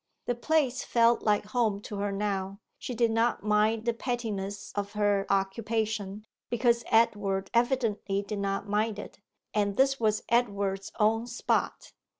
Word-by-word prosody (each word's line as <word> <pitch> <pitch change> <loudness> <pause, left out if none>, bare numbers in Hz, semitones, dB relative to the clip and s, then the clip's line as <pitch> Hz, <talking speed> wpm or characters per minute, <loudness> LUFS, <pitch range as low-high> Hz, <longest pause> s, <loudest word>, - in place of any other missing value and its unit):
The 245 - 0
place 265 0 +1
felt 235 0 +3
like 210 -1 +1
home 215 -2 0
to 205 - -7
her 200 0 -1
now; 195 -1 -2 0.2
she 250 - -5
did 230 0 +2
not 225 -1 +1
mind 215 +1 +2
the 235 - +2
pettiness 215 -5 -4
of 205 0 -3
her 205 -2 +1
occupation, 210 +1 -1 0.2
because 235 0 +2
Edward 200 -4 +2
evidently 230 -5 +1
did 205 0 -4
not 200 +1 -2
mind 210 +1 0
it; 205 - -9 0.3
and 205 -1 0
this 270 +1 +3
was 215 -2 +1
Edward's 200 -5 0
own 225 +2 +2
spot. 245 0 -1
215 Hz, 150 wpm, -28 LUFS, 200-235 Hz, 0.3 s, felt